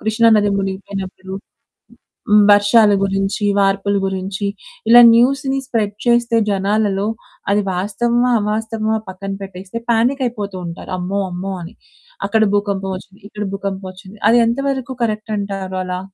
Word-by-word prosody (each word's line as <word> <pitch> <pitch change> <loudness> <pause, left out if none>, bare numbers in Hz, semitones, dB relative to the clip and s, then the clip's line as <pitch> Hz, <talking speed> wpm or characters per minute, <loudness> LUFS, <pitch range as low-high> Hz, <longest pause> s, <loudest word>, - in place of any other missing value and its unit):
కృష్ణా 220 +1 +2
నది 205 -1 +2
మునిగిపోయినప్పుడు, 190 -1 -5 1.2
వర్షాల 205 +1 +5
గురించి, 195 +1 -1
వార్పుల 195 +1 +1
గురించి, 190 +1 -3 0.4
ఇలా 240 +1 +9
న్యూస్‌ని 270 +3 +2
స్ప్రెడ్ 215 -5 -1
చేస్తే 235 -1 +3
జనాలలో 200 0 0 0.4
అది 205 +1 +3
వాస్తవమా 235 +6 0
అవాస్తవమా 220 +1 -1
పక్కన 195 +1 -6
పెట్టేస్తే 190 +2 -8
పానిక్ 240 +4 +2
అయిపోతూ 205 -5 -4
ఉంటారు, 170 +2 -8
"అమ్మో! 190 +3 -2
అమ్మో!" 190 +2 -4
అని. 170 +2 -9 0.5
అక్కడ 220 +2 +2
భూకంపం 200 -2 -1
ఒచ్చింది, 190 +2 -16
ఇక్కడ 210 0 -5
భూకంపం 195 -1 -4
ఒచ్చింది, 185 +3 -14
అదెంత 235 0 +3
వరకు 265 -1 -3
కరక్టంటారలా? 195 -4 -3
205 Hz, 120 wpm, -18 LUFS, 195-225 Hz, 1.2 s, ఇలా